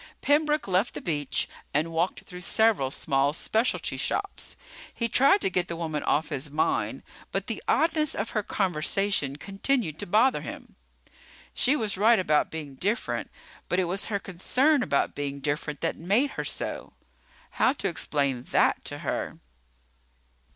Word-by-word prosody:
Pembroke 300 -1 +2
left 190 +4 +1
the - - -3
beach 145 -5 -1 0.3
and 155 +3 +1
walked 165 +3 0
through 180 0 -10
several 215 -8 +3
small 140 +1 +1
specialty 220 +8 0
shops. 400 -1 -3 0.4
He 235 - -1
tried 275 - +5
to - - +1
get 180 -1 0
the 170 - -4
woman 160 -3 -3
off 160 - +1
his 145 -1 -3
mind, 150 +2 0 0.3
but - - -2
the - - -4
oddness 315 -2 +2
of 205 +3 -3
her 215 - 0
conversation 190 -5 0
continued 195 - -1
to - - -3
bother 225 +8 +3
him. - - -9 0.8
She 270 +4 +3
was 215 -8 -1
right 225 +3 +6
about 155 -6 +2
being 150 -3 -7
different, 205 - -2 0.4
but 180 - +1
it 185 - +3
was 180 +3 -1
her 210 - 0
concern 255 - +1
about 140 - +1
being 140 -1 -4
different 150 +1 -3
that - - 0
made 210 - +1
her - - -4
so. - - -4 0.7
How 260 - +6
to 235 -8 -2
explain 140 -7 0
that - - +2
to - - -4
her? - - -2
185 Hz, 160 wpm, -27 LUFS, 150-230 Hz, 0.8 s, right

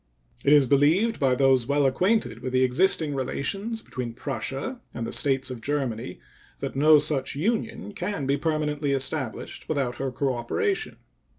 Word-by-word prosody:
It 140 - +3
is 145 -2 +7
believed 155 - +3
by 130 -2 +3
those 130 -2 +3
well 145 0 +2
acquainted 180 - +1
with 130 +1 -5
the 130 0 +3
existing 150 +3 +2
relations 195 - -3
between 125 -3 -5
Prussia 135 - -4
and 120 - -3
the - - -5
States 135 -2 +1
of 120 -3 -7
Germany 125 -7 -3 0.4
that - - -5
no 150 +3 +6
such 145 -2 0
union 220 +5 -2
can 200 -10 -3
be 140 +1 +2
permanently 150 -1 -1
established 135 -2 -3
without 135 -6 -1
her 135 - -2
cooperation. 135 - -1
140 Hz, 155 wpm, -25 LUFS, 130-155 Hz, 0.4 s, is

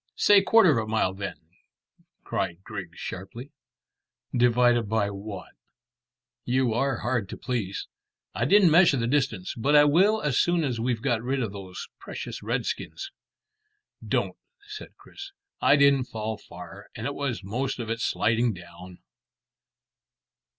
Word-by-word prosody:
"Say 205 -1 +5
quarter 190 - +5
of - - -1
a - - -9
mile 110 -4 +1
then," 100 +1 -5 0.9
cried 90 +2 -3
Griggs - - -8
sharply. 115 +9 -7 0.8
"Divided 120 -2 +3
by 105 -2 0
what?" 100 -2 -8 0.9
"You 125 -1 +1
are 135 +1 0
hard 120 -4 -1
to - - -7
please. 115 -6 -3 0.5
I 120 - -1
didn't 195 +2 +5
measure 165 -3 +6
the 115 - -1
distance; 120 -8 0
but 140 +6 +1
I 145 - +8
will 190 +9 +4
as 150 -7 0
soon 175 -1 +2
as 125 -5 -2
we've 120 -1 -1
got 120 -5 +1
rid 130 +2 -1
of 105 -3 -4
these 95 -2 -8
precious - - -7
redskins." 390 0 -4 0.9
"Don't," - - -1 0.3
said 425 0 -10
Chris. 395 0 -11 0.3
"I - - +5
didn't 140 -2 +4
fall 110 -1 -4
far, 90 +2 -12
and 115 -1 -6
it 145 - -2
was 135 -7 -3
most 125 +7 -3
of 115 -2 -4
it 115 - -2
sliding 115 +1 +1
down." 90 0 -13
120 Hz, 145 wpm, -26 LUFS, 105-140 Hz, 0.9 s, I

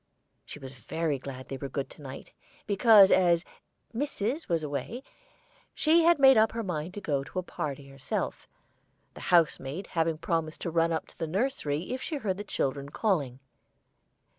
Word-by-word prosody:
She - - -9
was 135 -2 -10
very 160 -2 -2
glad 130 -1 -8
they 135 - -5
were 140 0 -6
good 135 +1 -3
to - - -14
night, 135 -1 -9 0.3
because, 205 -1 +7
as 175 -2 +4 0.5
"missis" 265 +2 -2
was 165 -2 +1
away, 150 - -4 0.7
she 320 +2 +4
had 340 0 +6
made 270 -4 +7
up 220 0 +3
her 230 0 -3
mind 175 -2 -4
to 205 - -5
go 140 -6 -1
to 140 - -10
a 185 - 0
party 140 -5 -5
herself, 135 -1 -4 0.7
the - - -11
house 170 -3 +3
maid 145 +9 -6
having 165 -2 0
promised 165 -1 -2
to 170 - -3
run 165 0 +2
up 160 - -1
to - - -21
the 165 - -2
nursery 180 - -1
if 260 - -4
she 320 - -3
heard 200 -9 -2
the 205 - -5
children 140 -7 -2
calling. 145 - -1
165 Hz, 180 wpm, -29 LUFS, 140-210 Hz, 0.7 s, because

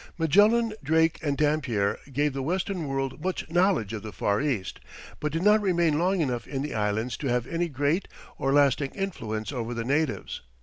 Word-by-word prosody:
Magellan, 210 +8 +4
Drake 160 +3 +2
and 145 -3 -1
Dampier 130 -10 +1
gave 145 +2 +1
the 135 - -3
western 175 +2 -2
world 135 +1 -3
much 185 0 -2
knowledge 175 - +2
of 110 - -4
the 110 - -7
Far 100 0 0
East, 130 -10 -2 0.4
but 150 - -2
did 165 +3 -2
not 210 +1 +5
remain 170 -6 +2
long 185 +1 +2
enough 125 -6 -2
in 135 -1 -3
the 150 - -4
Islands 110 +3 -1
to 140 - -4
have 120 -1 +1
any 170 +4 -2
great 145 +6 0 0.3
or 135 - +1
lasting 140 -1 +3
influence 115 - -3
over 120 -3 -4
the 115 -1 -3
natives. 145 +2 -1
145 Hz, 185 wpm, -27 LUFS, 125-170 Hz, 0.4 s, not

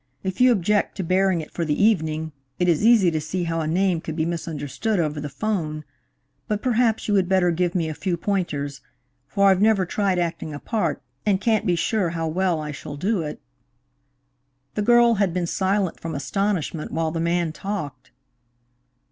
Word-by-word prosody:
If 190 +3 -3
you 255 0 +7
object 205 -1 +1
to 190 - -2
bearing 185 0 +2
it 155 - -10
for 170 - -2
the 150 -2 -1
evening, 160 -7 +1 0.3
it 180 - +1
is 170 +2 +2
easy 220 -6 +5
to 155 -1 -1
see 175 +4 -3
how 165 -1 -1
a 155 - -2
name 180 0 +1
could 160 - -5
be 160 -1 0
misunderstood 170 +4 -2
over 150 -2 -1
the 145 - -4
'phone. 155 -4 -2 0.6
But 210 -1 -2
perhaps 235 -2 +1
you 210 - +1
would 190 -3 +2
better 185 -2 +3
give 175 +1 0
me 170 -3 +1
a 155 - -3
few 175 +2 -2
pointers, 150 -8 -2 0.5
for 200 +8 +3
I've 190 0 +2
never 210 -3 +4
tried 195 0 0
acting 165 -3 -2
a - - -6
part, 175 -9 -2 0.2
and 200 -3 +2
can't 220 -1 +1
be 175 - +3
sure 195 +1 0
how 165 -1 -2
well 175 0 0
I 150 -1 -4
shall 145 0 -8
do 195 +4 0
it." 150 -2 -5 1.3
The 210 - -1
girl 240 +2 +5
had 185 -3 +1
been 180 -1 0
silent 190 +1 0
from 165 -2 -5
astonishment 165 +2 -2
while 160 0 -1
the 165 - -3
man 170 0 0
talked. 155 -10 -5
175 Hz, 190 wpm, -23 LUFS, 160-200 Hz, 1.3 s, you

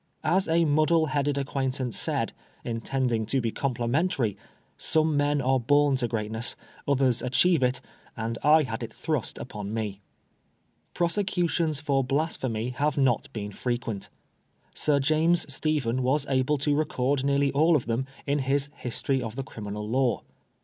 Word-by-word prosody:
As 185 +2 +2
a 165 +1 +3
muddle 155 +2 +3
headed 145 0 0
acquaintance 130 -3 -2
said, - - 0 0.3
intending 115 -1 -1
to 135 +4 +1
be 115 -3 -1
complimentary. 125 - 0 0.4
Some 155 -1 +1
men 145 0 +2
are 130 +1 +3
born 145 +3 +3
to 120 - -1
greatness, 110 0 -2 0.3
others 135 -4 +2
achieve 160 +6 +3
it, 125 0 +1 0.4
and 115 0 -3
I 155 +2 +6
had 115 -3 -4
it 115 - -5
thrust 155 -7 -2
upon 105 -3 -6
me. 105 -3 -3 0.9
Prosecutions 170 -4 0
for 140 -3 +1
Blasphemy 130 -5 -1
have 145 +3 -1
not 130 -4 +2
been 105 -2 -5
frequent. 120 -2 -3 0.6
Sir 145 -2 +2
James 155 +5 +2
Stephen 135 -5 0
was 135 +3 +1
able 135 +2 +1
to 145 +1 +1
record 140 -2 0
nearly 140 0 +2
all 160 +4 +4
of 140 - +1
them 120 +3 -1 0.2
in 145 +1 +1
his 140 +2 0
'' - - -30
History 130 +2 0
of 115 -2 -5
the 135 - -3
Criminal 105 -4 -6
Law." 125 +1 +1
135 Hz, 150 wpm, -27 LUFS, 120-150 Hz, 0.9 s, I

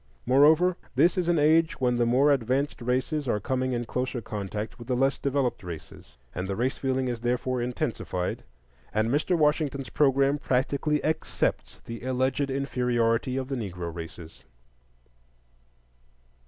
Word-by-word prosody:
Moreover, 155 +7 +5 0.2
this 175 - +4
is 180 -2 0
an 175 -1 +3
age 160 +2 +3
when 125 -2 +2
the 120 -1 +2
more 135 +5 +4
advanced 135 +2 0
races 130 +4 -1
are 105 -3 +1
coming 130 +3 -1
in 120 0 -2
closer 125 +1 -2
contact 105 +1 -5
with 120 - -10
the 125 - 0
less 135 +2 +1
developed 140 -2 0
races, 80 -7 -10 0.2
and 90 +2 -3
the 100 - -2
race 125 +5 0
feeling 130 -1 -1
is 120 -2 -2
therefore 125 +1 -1
intensified; 120 - -3 0.5
and 110 +2 +1
Mr. 155 +5 +1
Washington's 150 -3 +1
programme 140 0 +3
practically 140 +3 0
accepts 160 +1 -1
the 115 0 -8
alleged 130 +2 0
inferiority 125 -2 0
of 130 -1 -2
the 135 - -3
Negro 90 -7 -5
races. 85 0 -9
130 Hz, 145 wpm, -27 LUFS, 120-140 Hz, 0.5 s, Moreover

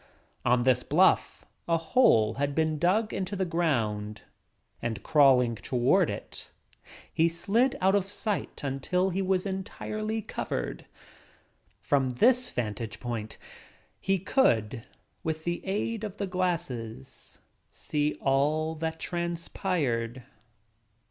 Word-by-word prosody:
On 120 0 +3
this 125 -1 +3
bluff - - +2 0.2
a 165 -1 +3
hole 160 - +3
had 140 +3 -2
been 155 -1 +1
dug 200 +7 +2
into 190 +1 -3
the 190 -1 0
ground 115 - -1 0.6
and 115 -2 -3
crawling 130 -5 +5
toward 120 +2 +2
it - - -7 0.6
he 165 +1 +3
slid 205 +10 +1
out 190 +1 +3
of 200 -2 +2
sight 205 0 -3
until 180 +8 0
he 190 +2 -1
was 185 0 +1
entirely 215 +3 -4
covered. - - -4 1.0
From 135 -2 +2
this 250 - +4
vantage 110 -1 -4
point 115 -3 -5 0.6
he 195 0 +1
could, 120 - +1 0.4
with 160 0 -3
the 175 +1 -3
aid 210 +3 -2
of 210 -1 -5
the 200 - -2
glasses, 170 - -4 0.3
see 150 0 -2
all 150 +4 +1
that 160 0 -4
transpired. 170 - -2
160 Hz, 115 wpm, -28 LUFS, 125-190 Hz, 1.0 s, crawling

